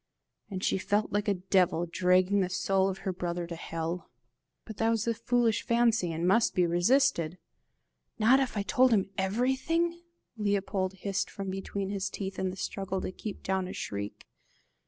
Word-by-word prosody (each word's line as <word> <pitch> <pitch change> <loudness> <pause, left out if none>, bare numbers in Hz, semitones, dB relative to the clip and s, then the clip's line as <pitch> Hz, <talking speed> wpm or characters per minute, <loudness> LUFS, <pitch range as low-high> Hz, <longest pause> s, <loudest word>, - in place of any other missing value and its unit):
And 190 -2 -5
she - - +1
felt 205 +3 0
like 205 +1 0
a 200 - +3
devil 180 -2 +2
dragging 185 +3 +3
the 185 -2 +1
soul 190 0 +1
of 190 - -5
her 190 - 0
brother 175 -1 -3
to 170 0 -6
hell. 165 +1 -4 0.6
But 220 -2 -9
that 225 +2 +2
was 225 -1 +1
a 230 - +1
foolish 230 -1 +1
fancy, 230 -6 +2
and 165 +2 -1
must 225 +5 +3
be 180 - +4
resisted! 175 - +2 0.8
"Not 240 +4 +5
if 260 -5 -1
I 200 - 0
told 255 +5 +4
him 195 -2 +1
everything?" 265 - 0 0.4
Leopold 200 -2 0
hissed 195 +1 -2
from 195 -1 -5
between 195 0 -4
his 195 -1 -2
teeth 195 -1 -5
in 190 - 0
the 185 - -6
struggle 190 0 -3
to - - -3
keep 205 +2 -7
down 190 -1 -1
a - - -6
shriek. 100 0 -5
195 Hz, 175 wpm, -29 LUFS, 185-220 Hz, 0.8 s, Not